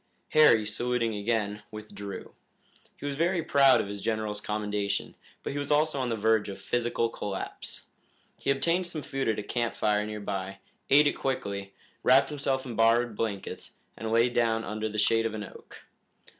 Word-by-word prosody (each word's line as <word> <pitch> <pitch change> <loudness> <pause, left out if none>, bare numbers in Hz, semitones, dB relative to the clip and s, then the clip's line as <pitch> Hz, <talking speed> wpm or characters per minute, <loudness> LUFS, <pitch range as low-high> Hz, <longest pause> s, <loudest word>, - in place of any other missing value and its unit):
Harry, 115 -8 +6
saluting 115 +2 -1
again, 105 -1 -1
withdrew. 105 -2 -8 0.6
He - - -8
was 140 -1 -2
very 170 +2 +1
proud 140 -3 +5
of - - -1
his 100 0 -6
general's 110 -1 -2
commendation, 105 -1 -2 0.3
but - - -3
he 145 - -2
was 145 - -4
also 150 -1 +2
on 125 -2 -1
the 115 - 0
verge 110 -1 +2
of 100 - -7
physical 120 -1 0
collapse. 105 -3 -5 0.5
He - - -2
obtained 170 +6 +2
some 160 -4 -5
food 135 -3 -2
at 110 - +1
a 105 - -3
camp 120 +2 -1
fire 105 -1 +1
near 105 0 -5
by, 100 -1 -4 0.3
ate 145 +2 +7
it 145 - +3
quickly, 100 -7 -3 0.3
wrapped 135 +3 +5
himself 135 -2 -1
in 120 -3 -6
borrowed 115 0 +3
blankets, 105 -3 -4 0.2
and 110 - -5
lay 115 +1 +5
down 115 -2 +1
under 110 0 -3
the 105 - -6
shade 115 +2 +3
of 110 - -5
an 105 - -4
oak. - - -13
115 Hz, 180 wpm, -28 LUFS, 105-135 Hz, 0.6 s, ate